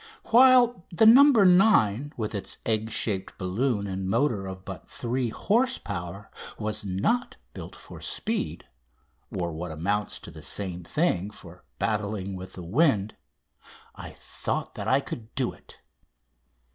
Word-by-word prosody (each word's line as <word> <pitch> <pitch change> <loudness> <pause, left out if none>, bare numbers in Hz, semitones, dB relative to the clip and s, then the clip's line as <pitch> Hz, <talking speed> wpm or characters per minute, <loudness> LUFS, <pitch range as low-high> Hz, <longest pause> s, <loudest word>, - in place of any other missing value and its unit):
While 245 -4 +6
the 180 +6 +3
"No. 235 +5 +9
9," 185 - +5
with 110 -2 -3
its 100 - -3
egg 110 0 0
shaped 100 -4 -1
balloon, 100 +4 -1
and 95 -1 -3
motor 115 -4 +1
of 95 0 -8
but - - -9
3 120 0 -2
horse 240 - +1
power, 90 +4 -7 0.3
was 110 0 -3
not 100 - -1 0.2
built - - -9
for - - -12
speed 220 -1 -3 0.7
or, 85 -2 -3
what 85 +3 -5
amounts 100 +7 -2
to - - -10
the - - -11
same 90 -3 -4
thing, 100 - 0
for 90 -4 -13
battling 105 -3 -2
with 95 0 -9
the 90 - -8
wind 110 - +2 0.8
I - - -9
thought - - -5
that - - -6
I 135 +1 +3
could 115 -4 -8
do - - -1
it. - - -17
110 Hz, 145 wpm, -26 LUFS, -, 0.8 s, No